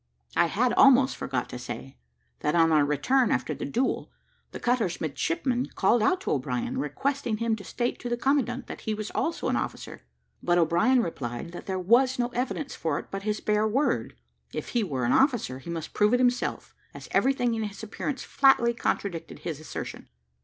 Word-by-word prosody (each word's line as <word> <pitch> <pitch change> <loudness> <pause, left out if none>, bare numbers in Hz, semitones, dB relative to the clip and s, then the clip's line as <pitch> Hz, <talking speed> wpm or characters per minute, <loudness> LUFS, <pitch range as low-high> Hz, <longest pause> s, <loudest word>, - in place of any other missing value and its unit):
I - - +4
had - - +1
almost - - +6
forgot - - -2
to - - -6
say, 65 +1 -7 0.4
that 150 - 0
on 165 -1 +5
our 155 -2 +5
return 240 - +2
after 125 0 0
the - - -5
duel, 245 - -1 0.4
the - - -7
cutter's 235 -8 0
midshipman 255 - -1
called 215 +4 +3
out 370 - +2
to - - -2
O'Brien, 245 +2 -1
requesting 275 -5 -1
him 230 0 0
to 200 - -10
state 240 +5 -2
to 245 - -5
the 240 - 0
commandant 265 -1 0
that - - -8
he 220 -2 -2
was 215 0 -5
also 330 - -1
an - - +1
officer; - - -4 0.4
but 175 0 +2
O'Brien 175 +10 +3
replied, 135 -2 -5
that 175 - -9
there 190 -1 -1
was 240 +8 +3
no 240 -1 0
evidence 255 +4 -3
for 160 -3 -1
it - - -8
but 195 - -4
his 210 +1 -2
bare 210 0 +2
word. 230 - 0 0.4
If - - -4
he 235 - +1
were 135 -10 -2
an 120 - +2
officer, 240 - +2
he 135 - -10
must 165 -2 -5
prove 210 +3 +3
it - - +1
himself, 250 -1 0 0.2
as - - -9
everything 250 -3 +2
in 225 - -2
his 205 -1 -5
appearance 255 +5 -4
flatly 255 -4 +4
contradicted 175 -7 -3
his 155 -4 -4
assertion. 155 - -7
220 Hz, 195 wpm, -27 LUFS, 170-255 Hz, 0.4 s, almost